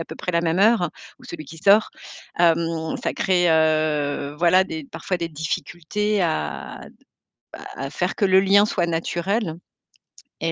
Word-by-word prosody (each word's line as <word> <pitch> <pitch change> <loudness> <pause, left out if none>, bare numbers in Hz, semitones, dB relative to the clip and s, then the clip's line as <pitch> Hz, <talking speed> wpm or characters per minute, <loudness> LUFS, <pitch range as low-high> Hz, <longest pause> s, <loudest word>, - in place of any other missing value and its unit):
à 165 - -4
peu - - -8
près 180 - -4
la 170 - +2
même 170 +2 0
heure, 215 -4 +4 0.3
ou - - -18
celui 160 -2 -8
qui 155 +4 -12
sort. 200 +6 +4 0.5
Hem, 165 -1 +1
ça - - -1
crée, 180 -2 +2
heu, 155 -3 +1
voilà, 180 +2 +4
des 315 +7 -6
parfois 190 -8 -4
des 170 -1 -3
difficultés 175 +6 -2
à, 75 - -3
d - - -25 0.5
à 135 - -8
à 135 - -7
faire 180 +1 -2
que - - +1
le 190 -1 +5
lien 200 +1 +4
soit 180 -4 -1
naturel 170 +3 -2 0.9
et 165 0 0
170 Hz, 170 wpm, -22 LUFS, 160-190 Hz, 0.9 s, le